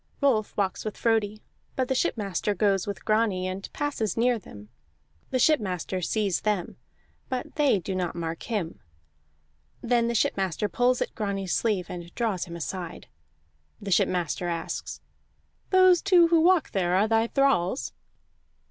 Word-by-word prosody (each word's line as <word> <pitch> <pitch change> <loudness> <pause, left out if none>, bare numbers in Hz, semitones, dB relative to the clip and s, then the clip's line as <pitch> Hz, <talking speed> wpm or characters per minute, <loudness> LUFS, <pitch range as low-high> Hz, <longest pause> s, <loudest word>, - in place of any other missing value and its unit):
Rolf 245 -7 +1
walks 195 -2 -1
with 215 - -5
Frodi, 215 -2 0 0.3
but 260 -1 0
the 265 - +1
shipmaster 205 -5 -1
goes 195 -1 +1
with 200 -4 -6
Grani, 215 -4 +1
and 185 +1 -6
passes 280 -9 -2
near 240 0 +2
them; 105 - -13 0.6
the - - 0
shipmaster 195 - +1
sees 200 0 0
them, 210 -4 -1 0.5
but 255 -2 -4
they 290 -7 +3
do 190 +1 -4
not 180 -2 -2
mark 165 -1 -4
him. 205 -8 -3 1.0
Then 235 -1 +2
the 235 - -1
shipmaster 195 -2 0
pulls 245 +5 +2
at - - -10
Grani's 195 -4 -2
sleeve, 205 -6 +1
and 175 -1 -8
draws 215 -7 -1
him 170 -2 -8
aside. 175 +1 -6 0.7
The 200 -1 -6
shipmaster 175 -1 +1
asks: 170 -1 -4 0.7
"Those 370 -2 +6
two 355 -4 +5
who 330 -1 +4
walk 355 0 +3
there 180 -2 +1
are 200 +3 +3
thy 225 +1 +2
thralls?" 190 - +1
205 Hz, 150 wpm, -26 LUFS, 185-240 Hz, 1.0 s, Those